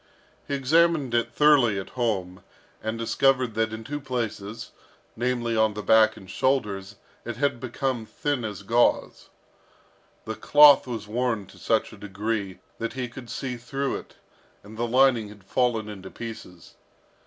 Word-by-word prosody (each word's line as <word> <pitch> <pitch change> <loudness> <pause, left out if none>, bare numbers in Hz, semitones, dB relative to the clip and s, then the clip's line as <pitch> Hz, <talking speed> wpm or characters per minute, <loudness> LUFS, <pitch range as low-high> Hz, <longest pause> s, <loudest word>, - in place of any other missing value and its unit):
He 140 - -1
examined 150 -1 +2
it 115 0 +1
thoroughly 130 -7 +4
at 95 - -7
home, 100 -7 -2 0.4
and 110 +1 -3
discovered 125 +1 +2
that 110 0 0
in 110 0 -6
two 145 +5 -5
places, 115 -5 -4 0.4
namely, 120 -1 -1
on 110 -1 +2
the 105 - -5
back 110 0 +5
and 95 - -13
shoulders, 100 -3 -1 0.3
it 120 -1 -5
had 140 0 0
become 130 -2 -3
thin 145 -1 -2
as 105 -3 -5
gauze. 115 +4 +1 1.0
The 110 - -3
cloth 145 +5 +6
was 115 -4 -5
worn 115 -2 -1
to - - -17
such - - 0
a - - -12
degree 100 -1 -3 0.2
that 115 0 -3
he 125 -1 -3
could 125 0 -11
see 125 +2 -4
through 135 +3 -3
it, - - -13 0.5
and 105 +2 -12
the 120 +2 -2
lining 125 -3 +3
had 105 -1 -14
fallen 115 +1 0
into 95 -3 -8
pieces. 110 -7 -9
115 Hz, 155 wpm, -25 LUFS, 105-130 Hz, 1.0 s, cloth